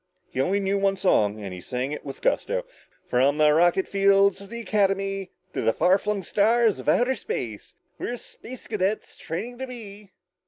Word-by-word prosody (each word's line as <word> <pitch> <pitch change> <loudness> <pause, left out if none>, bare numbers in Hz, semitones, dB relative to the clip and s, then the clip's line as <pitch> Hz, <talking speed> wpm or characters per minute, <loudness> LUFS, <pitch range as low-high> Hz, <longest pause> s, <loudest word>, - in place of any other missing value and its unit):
He 130 - 0
only 190 +8 +1
knew 200 0 0
one 195 0 +1
song 110 - +2
and 100 -3 -6
he 90 - -8
sang 125 +7 -3
it 150 - -5
with 135 -2 -8
gusto. - - 0 0.4
"From 135 +4 +2
the 150 -1 +5
rocket 175 +4 +3
fields 195 0 +3
of 200 - -11
the 235 +1 -6
Academy 195 -2 0 0.2
To - - -2
the 115 - +2
far 185 - +3
flung 205 -1 -2
stars 220 +4 +3
of - - -2
outer 250 +2 +3
space, 110 - -5 0.2
We're 245 - -3
Space 250 +1 -11
Cadets 210 -1 -2
training 225 +10 -6
to 265 - -4
be...." 210 -5 -10
195 Hz, 185 wpm, -25 LUFS, 155-215 Hz, 0.4 s, the